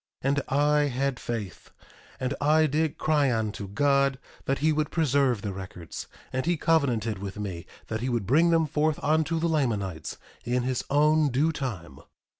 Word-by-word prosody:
1:16 135 - +2
And 140 0 +1
I 145 +2 +3
had 135 -1 -1
faith, 110 -6 -5 0.5
and 130 +1 -1
I 155 +2 +4
did 155 +1 0
cry 150 -4 +2
unto 110 -3 -2
God 140 +5 +2 0.3
that 135 - 0
he 155 +2 +2
would 155 0 0
preserve 140 -8 +1
the 100 -2 -3
records; 90 -3 -8 0.3
and 130 0 0
he 175 -1 +2
covenanted 120 -10 +1
with 100 0 -6
me 95 -5 -5 0.2
that 110 0 -4
he 130 - -1
would 120 -5 -1
bring 155 - +4
them 165 -1 +3
forth 155 0 0
unto 160 +2 +2
the 170 - +1
Lamanites 105 - -1 0.3
in 125 +1 0
his 130 -1 -1
own 150 +1 +4
due 140 +6 +2
time. 115 - -5
135 Hz, 175 wpm, -27 LUFS, 110-150 Hz, 0.5 s, I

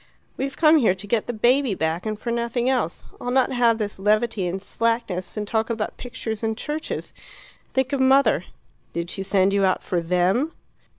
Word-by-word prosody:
"We've 270 +1 -4
come 315 0 +6
here 220 -10 +3
to 190 - -7
get 215 +1 0
the - - -1
baby 240 0 +2
back, 160 +5 -1
and 215 -1 -2
for 235 +2 -4
nothing 235 +1 -1
else. 250 -11 0 0.2
I'll 245 - -3
not 260 +1 +2
have 240 -3 +3
this 210 -3 -4
levity 215 -1 +1
and 180 +2 -2
slackness, 225 -2 -2
and 210 0 -3
talk 220 +2 0
about 225 -2 -3
pictures 235 -3 -5
and 220 -1 -1
churches. 305 +1 -4 0.6
Think 265 +1 +1
of 280 - +1
mother; 260 -7 +4 0.5
did 170 +1 -3
she 195 - -4
send 195 0 +2
you 200 -1 +2
out 185 -1 +2
for 175 -2 -1
THEM?" 180 - +1
220 Hz, 190 wpm, -23 LUFS, 195-250 Hz, 0.6 s, come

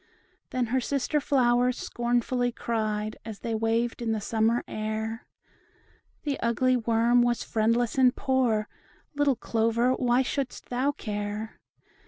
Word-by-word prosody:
Then 255 -1 0
her 260 - +3
sister 280 +3 0
flowers 250 -2 +2
scornfully 245 +1 0
cried, 215 -2 -2
As 215 -2 -8
they 230 - -3
waved 225 +2 0
in 225 -1 0
the 220 - -1
summer 225 +2 +1
air, 220 +2 -4 1.0
"The 290 -3 -2
ugly 255 +2 +2
worm 235 +1 +3
was 240 0 +1
friendless 230 +3 +1
and 255 0 +5
poor; 245 -5 +1 0.5
Little 285 -2 +2
Clover, 230 +1 +1
why 250 0 +2
shouldst 265 0 -4
thou 255 +3 +1
care? 210 -3 -5
235 Hz, 130 wpm, -27 LUFS, 220-250 Hz, 1.0 s, and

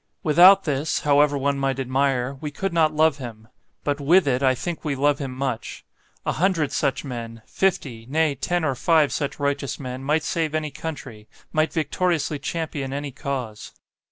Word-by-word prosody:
WITHOUT 180 +5 +7
this, 150 -1 -1
however 145 0 +3
one 140 0 0
might 135 -1 -1
admire, 135 0 0
we 150 - -3
could 190 +5 -3
not 160 -2 +3
love 155 -1 +2
him; 110 -4 -9 0.4
but 145 0 -1
WITH 175 +6 +5
it 130 -1 +1
I 130 -1 +3
think 170 +6 -5
we 150 -3 -1
love 145 +1 +2
him 135 -3 -4
much. 130 -2 -4 0.4
A - - +1
hundred 170 -5 +1
such 140 0 -1
men 115 -3 -7
fifty 130 -12 -1
nay, 155 0 +2
ten 175 +5 -1
or 135 - +1
five 155 +2 +2
such 145 0 -3
righteous 140 -1 -2
men 130 -1 -6
might 150 +3 +1
save 160 -1 -1
any 155 -1 -2
country; 130 -10 -7 0.3
might 155 0 +2
victoriously 160 -2 0
champion 145 -3 -4
any 140 0 -4
cause. 130 -6 -5
145 Hz, 175 wpm, -23 LUFS, 135-155 Hz, 0.4 s, WITHOUT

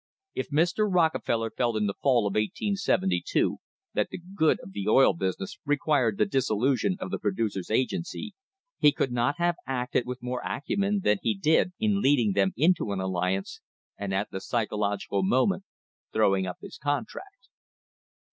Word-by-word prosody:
If - - -3
Mr. 175 +8 +2
Rockefeller 160 -10 +1
felt 120 -3 0
in 105 - +1
the 100 - -1
fall 125 -6 +3
of 100 - 0
1872 105 - 0 0.4
that - - 0
the: - - -6
'good 175 -3 +1
of 95 - -11
the 100 0 -5
oil 135 +5 +6
business" 95 - -4
required 145 -7 +1
the - - +3
dissolution 135 - +1
of 185 - -5
the - - -2
Producers' 100 -2 -2
Agency, 175 - -2 0.5
he 150 - +6
could 135 -2 -1
not 120 +3 +1
have 175 0 +1
acted 125 -1 -1
with 125 -1 -6
more 125 0 -3
acumen 200 +8 -1
than 105 -1 +3
he 110 -3 0
did 160 - +2
in 210 -2 +1
leading 130 - +3
them 95 -1 +2
into 160 - +2
an 95 - -3
alliance, 95 +1 -2 0.3
and 100 -1 -4
at 95 +2 -1
the 95 - -5
psychological 105 -3 -1
moment 130 - +2 0.5
throwing 95 -3 +2
up 90 - -5
his - - -10
contract. 250 - -4
125 Hz, 160 wpm, -27 LUFS, 100-170 Hz, 0.5 s, oil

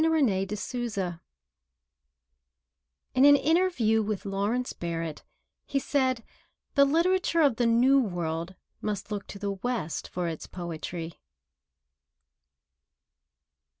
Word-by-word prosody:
TO 325 - +4
THE 210 -5 0
WEST 190 -7 -3 1.9
[In 260 - +4
an 285 0 +9
interview 290 -8 +2
with 210 -2 -3
Lawrence 205 +6 -1
Barrett, 165 -2 -4 0.4
he 280 - -1
said: 260 -3 +1 0.5
"The 280 -1 +6
literature 335 +3 +2
of 275 -7 +4
the 240 - +2
New 250 +4 +5
World 175 -5 -2 0.3
must 210 0 -3
look 205 -1 -4
to - - -8
the 200 0 -2
West 195 -4 -3
for 180 -1 -3
its 160 -2 -5
poetry." 170 -1 -6
215 Hz, 110 wpm, -28 LUFS, 180-270 Hz, 1.9 s, an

